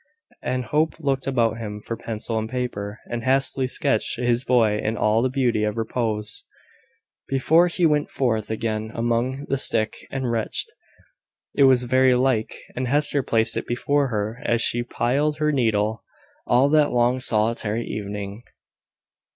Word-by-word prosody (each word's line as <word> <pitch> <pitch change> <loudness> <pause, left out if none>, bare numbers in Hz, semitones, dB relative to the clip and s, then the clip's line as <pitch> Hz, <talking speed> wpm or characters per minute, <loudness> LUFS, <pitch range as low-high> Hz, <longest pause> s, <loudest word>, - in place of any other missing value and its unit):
And 125 0 -2
Hope 155 +8 0
looked 135 -3 -1
about 115 -4 +1
him 105 -2 -6
for 115 +2 -5
pencil 115 0 -4
and 110 0 -4
paper, 115 -5 -4
and 120 -1 -5
hastily 135 0 +1
sketched 110 -3 +1
his 120 0 +1
boy 115 -5 +2
in 110 +1 -2
all 110 +2 +2
the 130 - +1
beauty 125 -5 0
of 105 +1 -1
repose, 110 -2 -3 0.8
before 160 +6 +3
he 175 0 0
went 150 -2 +2
forth 110 -5 -1
again 110 -1 -2
among 120 +4 -1
the 135 - -1
sick 110 -4 -1
and 130 -3 -2
wretched. 115 -2 -1 0.9
It 140 - +4
was 130 -2 +5
very 130 +1 +3
like; 125 -3 0 0.2
and 130 0 -2
Hester 145 +1 +3
placed 115 -2 +1
it - - -3
before 140 +4 +1
her 110 0 -3
as 120 - +1
she 120 - +2
plied 135 +5 0
her 150 0 +1
needle, 110 -5 0 0.4
all 125 +3 +4
that 150 -1 +4
long 120 +1 +2
solitary 110 -1 +1
evening. 100 0 -5
120 Hz, 155 wpm, -23 LUFS, 110-130 Hz, 0.9 s, was